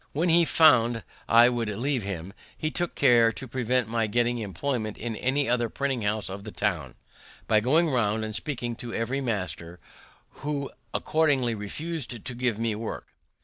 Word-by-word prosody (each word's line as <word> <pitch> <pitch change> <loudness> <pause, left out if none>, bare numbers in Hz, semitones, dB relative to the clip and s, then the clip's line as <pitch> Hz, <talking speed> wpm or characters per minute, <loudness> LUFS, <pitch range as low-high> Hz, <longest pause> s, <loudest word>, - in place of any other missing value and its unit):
When 165 +5 +1
he 170 +1 +5
found 120 -9 +4 0.3
I 115 +1 +7
would 120 -3 -2
leave 125 +5 -1
him, 95 -2 -5 0.2
he 155 - -2
took 175 +2 -2
care 120 -4 +5
to 135 - -6
prevent 125 -1 0
my 115 -1 0
getting 120 +2 +1
employment 110 - -3
in 115 -1 -4
any 135 +5 0
other 120 -1 +1
printing 135 -2 -2
house 105 0 -1
of 95 +1 -7
the 110 - -7
town, 95 -7 -2 0.5
by 110 - +4
going 155 +10 +3
round 110 -5 +1
and 110 - -5
speaking 120 -1 -2
to 120 -1 -6
every 125 +4 -1
master, 90 -7 -4 0.5
who 145 -1 -4 0.2
accordingly 140 -7 +1
refus'd 120 +3 -5
to - - -4
give 120 -3 0
me 115 -1 0
work. 110 +1 -6
120 Hz, 170 wpm, -27 LUFS, 110-135 Hz, 0.5 s, I